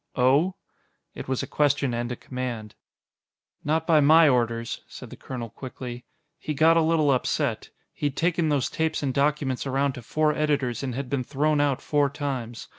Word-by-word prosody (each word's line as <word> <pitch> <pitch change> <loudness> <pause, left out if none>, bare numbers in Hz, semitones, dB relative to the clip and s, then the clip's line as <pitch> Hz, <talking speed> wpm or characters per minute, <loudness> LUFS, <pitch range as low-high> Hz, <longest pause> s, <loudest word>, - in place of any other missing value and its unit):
"Oh?" 140 +9 +3 0.6
It - - -8
was 130 -1 -1
a - - -2
question 145 -3 +1
and 120 +1 -2
a - - -2
command. 120 -5 -5 0.9
"Not 160 +2 0
by 160 -2 +5
my 155 +3 +6
orders," 115 -3 0
said - - -11
the - - -8
colonel 120 -4 -7
quickly. 125 -1 -8 0.3
"He 150 - -4
got 160 +3 +5
a 165 - +4
little 160 -2 +3
upset. 130 - -1 0.2
He'd 145 -2 -3
taken 170 -1 +1
those 140 -4 +1
tapes 160 -1 -2
and 135 -2 0
documents 140 -2 0
around 135 +1 0
to 125 - -8
four 155 +6 +1
editors 145 -5 0
and 130 -3 -3
had 140 0 -4
been 135 -1 -1
thrown 145 +3 +1
out 140 -2 0
four 145 -2 +2
times. 130 -5 -5
140 Hz, 180 wpm, -25 LUFS, 125-150 Hz, 0.9 s, my